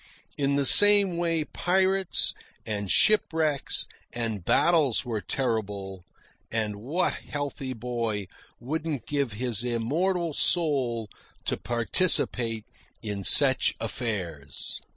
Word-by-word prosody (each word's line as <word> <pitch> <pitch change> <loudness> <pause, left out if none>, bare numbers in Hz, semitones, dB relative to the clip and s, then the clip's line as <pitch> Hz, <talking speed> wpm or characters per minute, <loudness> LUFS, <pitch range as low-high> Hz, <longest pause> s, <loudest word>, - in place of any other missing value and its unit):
In 140 -1 0
the 140 -1 +1
same 205 +1 +7
way 165 -2 0
pirates, 190 +3 0 0.3
and 100 -2 -4
shipwrecks, 160 - +1 0.3
and 115 -5 -4
battles 150 - +2
were 115 -3 -3
terrible; 100 -5 -3 0.5
and 110 -2 -2
what 145 - -1
healthy 145 -2 -5
boy 115 -3 -3 0.3
wouldn't 150 +2 -4
give 140 -5 -1
his 115 -1 -1
immortal 160 +9 -1
soul 135 -10 +1 0.4
to - - -1
participate 120 - 0 0.4
in 105 -2 -5
such 135 +5 +5
affairs? 95 - -5
125 Hz, 100 wpm, -26 LUFS, 110-160 Hz, 0.5 s, same